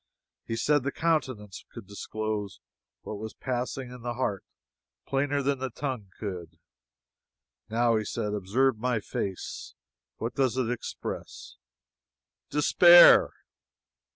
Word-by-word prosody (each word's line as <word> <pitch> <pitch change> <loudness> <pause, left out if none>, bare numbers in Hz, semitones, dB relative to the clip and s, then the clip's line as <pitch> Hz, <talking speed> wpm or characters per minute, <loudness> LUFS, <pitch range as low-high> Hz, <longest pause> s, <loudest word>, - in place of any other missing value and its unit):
He 115 - -2
said 145 +5 +2
the 140 +3 -2
countenance 130 - -2
could 115 -4 -10
disclose 105 0 -4 0.4
what 105 - -6
was 110 0 -7
passing 125 0 -4
in 125 -1 -10
the 120 0 -4
heart 105 -6 -2 0.6
plainer 140 +1 0
than 140 -1 0
the 130 0 -3
tongue 125 -5 -5
could. 90 -6 -6 1.1
"Now," 115 0 +2
he 110 - -1
said, 105 0 -3
"observe 110 +5 +1
my 125 -1 0
face 95 -2 -5 0.4
what 115 +2 -4
does 130 -2 0
it 125 -2 0
express?" 85 - -6 0.9
"Despair!" 175 +4 +7
120 Hz, 120 wpm, -28 LUFS, 105-135 Hz, 1.1 s, Despair